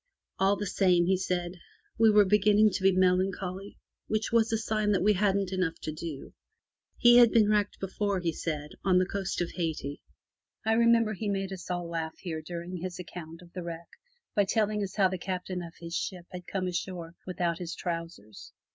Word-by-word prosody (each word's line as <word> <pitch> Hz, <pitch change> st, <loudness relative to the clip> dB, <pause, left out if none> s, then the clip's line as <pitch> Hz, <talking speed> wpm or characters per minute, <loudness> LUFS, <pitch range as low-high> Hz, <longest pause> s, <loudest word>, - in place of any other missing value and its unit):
All 195 Hz, +1 st, +4 dB
the 205 Hz, -, -4 dB
same, 180 Hz, -3 st, +3 dB
he 190 Hz, +2 st, +3 dB
said, 180 Hz, -1 st, -2 dB, 0.4 s
we 225 Hz, -1 st, +7 dB
were 210 Hz, -1 st, +6 dB
beginning 210 Hz, +2 st, +4 dB
to 190 Hz, -, -3 dB
be 195 Hz, 0 st, +5 dB
melancholy, 185 Hz, +1 st, 0 dB, 0.3 s
which 215 Hz, 0 st, -1 dB
was 225 Hz, -1 st, +3 dB
a 225 Hz, -, +2 dB
sign 215 Hz, -1 st, 0 dB
that 185 Hz, -, +1 dB
we 210 Hz, +1 st, +5 dB
hadn't 195 Hz, -1 st, +1 dB
enough 180 Hz, -3 st, -1 dB
to 155 Hz, -, -3 dB
do. 155 Hz, -2 st, -7 dB, 0.6 s
He 240 Hz, 0 st, +7 dB
had 240 Hz, -1 st, +8 dB
been 220 Hz, -2 st, +4 dB
wrecked 210 Hz, -1 st, +1 dB
before, 195 Hz, 0 st, -1 dB
he 170 Hz, -2 st, 0 dB
said 150 Hz, -3 st, -4 dB
(on 185 Hz, -2 st, +4 dB
the 185 Hz, -, +4 dB
coast 190 Hz, -1 st, -3 dB
of 170 Hz, -, -2 dB
Hayti). 155 Hz, -5 st, -3 dB, 0.6 s
I 220 Hz, -, +3 dB
remember 230 Hz, -1 st, +4 dB
he 210 Hz, +1 st, -3 dB
made 195 Hz, -1 st, -2 dB
us 185 Hz, -1 st, -9 dB
all 175 Hz, -1 st, -2 dB
laugh 165 Hz, -1 st, -4 dB
here 160 Hz, -4 st, -5 dB
during 175 Hz, +2 st, -6 dB
his 180 Hz, +1 st, -5 dB
account 170 Hz, -1 st, -9 dB
of 170 Hz, -, -18 dB
the 185 Hz, -, -5 dB
wreck 170 Hz, -1 st, -7 dB, 0.5 s
by 205 Hz, -2 st, +4 dB
telling 210 Hz, +1 st, +1 dB
us 195 Hz, -2 st, -4 dB
how 195 Hz, -3 st, +4 dB
the 185 Hz, 0 st, -4 dB
Captain 180 Hz, 0 st, -4 dB
of 170 Hz, -1 st, -9 dB
his 170 Hz, -1 st, -8 dB
ship 180 Hz, -3 st, -3 dB
had 180 Hz, -1 st, -8 dB
come 190 Hz, -2 st, -2 dB
ashore 175 Hz, -2 st, -4 dB
without 175 Hz, -2 st, -1 dB
his 170 Hz, -2 st, -5 dB
trousers. 165 Hz, -, -6 dB
185 Hz, 200 wpm, -29 LUFS, 175-205 Hz, 0.6 s, had